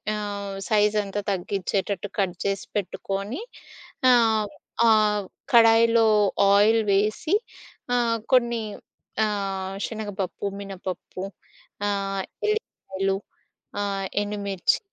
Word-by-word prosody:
ఆహ్, 200 -1 -4
సైజంతా 210 -1 +2
తగ్గించేటట్టు 195 +1 -2
కట్ 190 -3 +1
జేసి 195 -1 -1
పెట్టుకొని 200 - -3 0.7
ఆహ్, 220 -3 +4 0.4
ఆహ్, 210 -2 +3 0.3
కడాయిలో 230 0 +6 0.5
ఆయిల్ 215 +3 +5
వేసి 215 - +1 0.6
ఆహ్, 235 -1 +2 0.2
కొన్ని 235 -2 +3 0.6
ఆహ్, 195 -2 -3
శనగపప్పు, 205 -4 -4 0.2
మినపప్పు 190 -1 -6 0.7
ఆహ్, 195 -1 -1 0.3
ఎల్లికాయలు 195 - -2 0.7
ఆహ్, 195 -1 -2 0.2
ఎండుమిర్చి 200 -3 0
205 Hz, 80 wpm, -25 LUFS, 195-220 Hz, 0.7 s, కడాయిలో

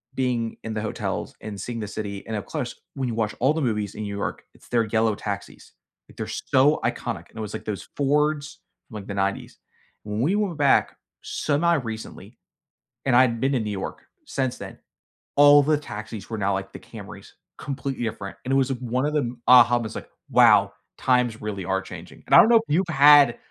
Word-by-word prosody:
being 120 -3 -1
in 110 - -4
the 110 - -3
hotels 110 - -4
and 105 -2 -7
seeing 120 +3 -5
the 105 - -4
city, 100 -1 -6
and, 110 - -4
up 105 - -5
close, 135 -7 -4 0.2
when 135 -2 -2
you 120 - -3
watch 110 -2 -1
all 130 +5 +3
the 160 - -2
movies 105 -6 -1
in 110 - -6
New 100 -1 -5
York, - - -4
it's - - -20
their 115 -2 +2
yellow 110 0 +1
taxis, 100 -1 -7 0.4
like, - - -18
they're - - -3
so 140 +4 +2
iconic, - - -3
and - - -17
it - - -4
was, 105 -1 -6
like, - - -6
those 105 -2 -5
Fords 150 +1 0 0.3
from, 120 - -13
like, 100 -2 -7
the 100 - -4
'90s. 100 0 -3 0.4
When 105 +1 -3
we 165 +10 +2
went 200 -6 -1
back 140 -2 +3 0.2
semi-recently, 145 -8 -2 0.7
and 135 - +2
I 125 - +7
hadn't 115 -3 +1
been 135 +2 +1
to 130 - +1
New 105 -1 -3
York 95 -2 -5 0.2
since 130 -2 -2
then, - - -9 0.6
all 145 0 +8
the 150 +1 +2
taxis 110 -7 -8
were 110 -2 -4
now, 100 0 +1
like, 95 0 -4
the - - -8
Camrys, - - -12 0.3
completely 135 -2 -4
different, 105 -3 -5
and 130 - -4
it - - +3
was 135 0 +2
one 125 +1 -2
of 150 - -1
the 150 - +2
m 120 -1 -6
uh, 125 -1 +9
almost 120 -3 0
like, - - -8 0.2
"Wow. - - +5 0.2
Times 125 -3 +1
really 105 -3 -4
are 95 +2 0
changing," - - -11
and - - -3
I - - +11
don't 225 - +7
know 235 - +6
if 225 - 0
you've 175 +5 +1
had 145 -5 +6
120 Hz, 215 wpm, -24 LUFS, 105-140 Hz, 0.7 s, I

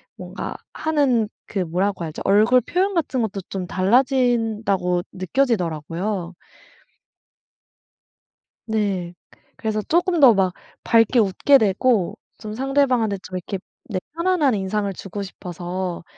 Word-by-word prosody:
뭔가 - - -6 0.2
하는 280 -8 +1 0.2
그 200 - -3
뭐라고 180 +2 -1
하죠? 155 - -7
얼굴 215 +6 +5
표현 370 - 0
같은 275 -6 0
것도 200 -3 -2
좀 190 -2 -4
달라진다고 220 -4 +1
느껴지더라고요. 185 - -1 2.3
네 200 -6 -1 0.4
그래서 215 -1 -2
조금 345 - +1
더 260 -5 +8
막 190 -3 +1 0.3
밝게 230 +1 +4
웃게 215 +7 +4
되고 210 -2 +1 0.2
좀 215 -1 -7
상대방한테 255 -4 +1
좀 185 - -8
이렇게 185 +2 -5 0.3
네 190 -4 -1
편안한 335 -7 +2
인상을 200 +1 -1
주고 195 +2 -7
싶어서 180 -1 -5
210 Hz, 250 characters per minute, -22 LUFS, 185-255 Hz, 2.3 s, 더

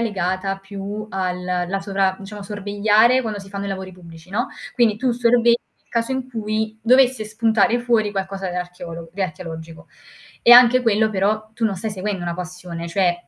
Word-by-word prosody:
legata 195 -3 -1
più 200 +2 -6
al 180 -1 -2
la 180 +1 -1
sovra 195 -1 0
diciamo, 205 +1 -9
sorvegliare 210 +4 +3
quando 220 -4 -4
si 195 -1 -10
fanno 200 0 -4
i - - -3
lavori 190 -1 -5
pubblici, 170 -1 -14
no, 240 +7 -1 0.3
quindi 235 -4 +3
tu 255 +3 0
sorvegli 235 0 +3 0.3
il - - -40
caso 230 +2 -1
in 260 -1 -3
cui 220 -2 -3
dovesse 255 0 +4
spuntare 225 +1 +2
fuori 235 -3 +1
qualcosa 195 -1 -4
dell'archeolog 175 -2 -6
di 195 +2 -3
archeologico. 160 -2 -7 0.5
E 240 - +8
anche 245 +1 +8
quello 220 -2 +2
però 215 +2 0
tu 225 - -2
non 205 -3 0
stai 220 +4 -4
seguendo 200 -1 -3
una 170 -1 -3
passione, 180 -1 -7
cioè, 175 0 +2
200 Hz, 175 wpm, -21 LUFS, 185-225 Hz, 0.5 s, E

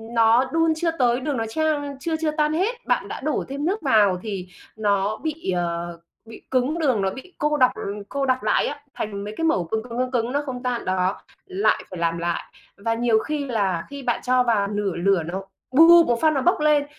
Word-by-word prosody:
nó 230 +3 +5
đun 325 -1 +3
chưa 330 +1 0
tới, 245 -1 +3
đường 270 0 -2
nó 225 - -1
chan 290 -1 -1
chưa 320 +3 -2
chưa 310 -1 +1
tan 300 0 +1
hết, 390 +9 0
bạn - - +1
đã - - -6
đổ 305 +2 -1
thêm 280 +3 -4
nước 395 +4 -1
vào 210 - +3
thì 195 -4 -5 0.3
nó 205 0 0
bị, 315 -9 -3
ờ, 170 -1 -3 0.3
bị 225 - -12
cứng, 265 +6 +1
đường 260 -9 +2
nó 195 - +1
bị 265 - -10
cô 300 0 +1
đọc, 255 -2 +5
ờ - - -7 0.3
cô 275 -1 -1
đặc 255 -1 0
lại - - +2
á, 290 - -5
thành 200 -2 -4
mấy 210 +1 -6
cái 325 - -3
mẩu 250 - +2
cứng 220 +6 -3
cứng, 235 -1 -7
cứng 255 0 -1
cứng 240 -1 0
nó 285 +2 0
không 250 -2 -6
tan, 245 -2 -2
đó, 185 +1 0 0.3
lại 385 +1 +1
phải 180 - -7
làm 170 0 0
lại. 170 0 -2 0.3
Và 225 +3 -1
nhiều 230 -1 +2
khi 295 +4 -3
là 195 -9 -1
khi 280 -1 -8
bạn 240 -2 0
cho 255 0 +3
vào 215 -4 +1
nửa 205 -2 -2
lửa 180 0 +2
nó 185 +4 -5 0.3
bụp 330 +4 +7
một 235 -1 +1
phát 315 -1 +4
nó 270 - 0
bốc 355 +2 +2
lên, 300 -1 +3
250 Hz, 235 wpm, -23 LUFS, 200-300 Hz, 0.3 s, bụp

